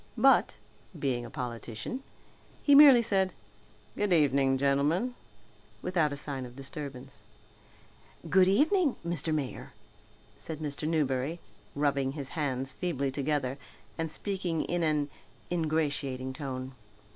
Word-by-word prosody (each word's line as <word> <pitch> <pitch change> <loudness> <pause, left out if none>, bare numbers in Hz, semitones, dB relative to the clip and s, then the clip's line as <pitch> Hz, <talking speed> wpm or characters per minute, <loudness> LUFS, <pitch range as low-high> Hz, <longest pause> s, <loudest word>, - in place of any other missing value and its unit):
But, - - +5 0.4
being 125 -3 -1
a - - -8
politician 120 - -5 0.6
he 285 - +5
merely 275 -4 +9
said, 190 -4 +1 0.6
"Good 205 -1 0
evening, 140 -4 +3
gentlemen," 145 - +1 0.7
without 170 -5 +1
a 145 - -4
sign 140 -2 -3
of 125 -1 -9
disturbance. 135 -1 -7 1.1
"Good 185 0 +5
evening, 300 - +3
Mr. 170 -2 -2
Mayor," 145 -4 -3 0.6
said 160 - -7
Mr. 150 0 -3
Newberry, 150 0 0 0.4
rubbing 140 -2 +1
his 140 -3 -6
hands 135 -4 -2
feebly 140 -3 -2
together 140 -1 -1 0.4
and 165 -1 -2
speaking 180 -2 -2
in 175 0 -1
an 150 -3 +1 0.4
ingratiating 145 -6 -1
tone. 130 -2 -5
145 Hz, 115 wpm, -30 LUFS, 135-175 Hz, 1.1 s, merely